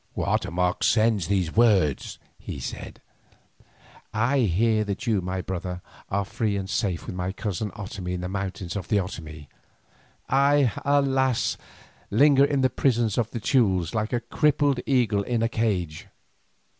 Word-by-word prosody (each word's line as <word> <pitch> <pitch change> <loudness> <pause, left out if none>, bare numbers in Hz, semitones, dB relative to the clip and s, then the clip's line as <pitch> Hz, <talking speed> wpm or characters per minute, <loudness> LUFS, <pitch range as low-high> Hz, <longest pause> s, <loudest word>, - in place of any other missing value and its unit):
"Guatemoc 90 +1 0
sends 110 -6 +3
these 95 -4 0
words," 100 - +2 0.2
he - - -7
said; - - -7 1.1
"I 120 +5 +1
hear 110 +1 +2
that 105 +3 -4
you, 110 -5 +1
my 90 +1 -3
brother, 90 -1 -5 0.3
are 100 +1 0
free 105 0 -1
and 95 -1 -4
safe 95 -3 -1
with - - -6
my 90 +1 -3
cousin 105 +1 -3
Otomie 95 -3 -5
in 90 - -4
the 90 - -3
mountains 95 -2 -4
of 95 -4 -4
the 105 - +2
Otomie. 80 -6 -5 0.8
I, 140 -1 +3
alas! 135 -3 +2 0.5
linger 140 +5 +5
in 140 -1 0
the 130 - +3
prisons 120 -5 +1
of 115 -2 0
the 120 - -5
Teules 95 - +1
like 110 -1 -1
a 120 -2 0
crippled 145 +2 +1
eagle 120 -7 +2
in 115 +2 -1
a - - +3
cage. 95 -10 -2
105 Hz, 150 wpm, -25 LUFS, 95-120 Hz, 1.1 s, linger